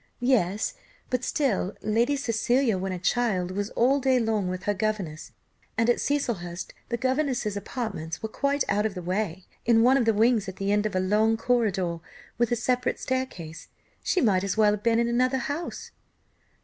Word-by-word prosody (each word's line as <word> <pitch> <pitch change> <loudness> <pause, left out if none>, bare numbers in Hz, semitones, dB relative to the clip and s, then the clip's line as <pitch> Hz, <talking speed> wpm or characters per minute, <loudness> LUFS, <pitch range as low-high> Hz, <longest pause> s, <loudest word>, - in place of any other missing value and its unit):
"Yes, 215 -6 +2 0.4
but 250 -1 0
still 230 -10 0
Lady 235 +6 +2
Cecilia, 245 -2 +1
when 190 +1 -3
a 185 - -3
child, 185 -2 0
was 200 +2 -2
all 265 +4 +3
day 260 -1 +3
long 220 -4 0
with 185 +1 -4
her 205 - +1
governess, 195 -6 -3 0.5
and 230 +1 +4
at - - -1
Cecilhurst 195 -12 -2 0.2
the 235 - -1
governess's 255 -4 0
apartments 200 -6 -5
were - - 0
quite 280 +4 0
out 210 +1 +2
of 205 - -8
the 180 - -4
way, 185 0 -2 0.2
in 225 -1 +4
one 260 +3 +5
of 250 - +2
the 225 - +4
wings 220 -2 +3
at 190 - -8
the 195 +1 -1
end 210 +1 +2
of 210 - -6
a - - +3
long 215 +4 +2
corridor, 200 -8 0 0.4
with 240 -1 +2
a - - +3
separate 250 +1 0
staircase; 255 -12 -4 0.4
she 370 - +1
might 195 -6 +3
as 200 +1 -2
well 210 -1 +5
have 210 -1 -2
been 230 +1 +2
in 235 0 +2
another 255 +2 +2
house." 285 +7 -4
220 Hz, 190 wpm, -26 LUFS, 195-250 Hz, 0.5 s, one